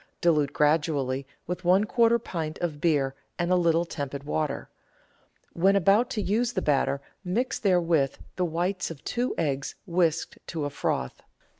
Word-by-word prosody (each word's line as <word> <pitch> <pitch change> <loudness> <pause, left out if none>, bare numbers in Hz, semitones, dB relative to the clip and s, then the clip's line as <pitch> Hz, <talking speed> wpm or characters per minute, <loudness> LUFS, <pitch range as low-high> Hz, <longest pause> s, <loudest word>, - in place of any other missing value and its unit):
Dilute 150 -4 +3
gradually 145 -3 +1 0.2
with 180 +2 -4
one 185 +3 +4
quarter 230 +1 +3
pint 165 -9 -4
of 155 -4 -3
beer 145 -5 +2 0.2
and 175 0 0
a - - +5
little 170 -1 +3
tepid 140 -4 -5
water. 150 -1 -2 0.9
When 195 +4 +3
about 200 +6 +4
to 215 -5 -2
use 235 +5 +1
the 185 - 0
batter 140 -1 +1 0.2
mix 220 +8 -1
therewith 170 -8 +2 0.2
the 180 - 0
whites 175 +3 -1
of 165 -4 -9
two 245 +1 -1
eggs 140 -4 -1
whisked 170 -3 0
to 160 -3 -3
a 145 - -3
froth. 65 - -2
170 Hz, 155 wpm, -27 LUFS, 145-190 Hz, 0.9 s, a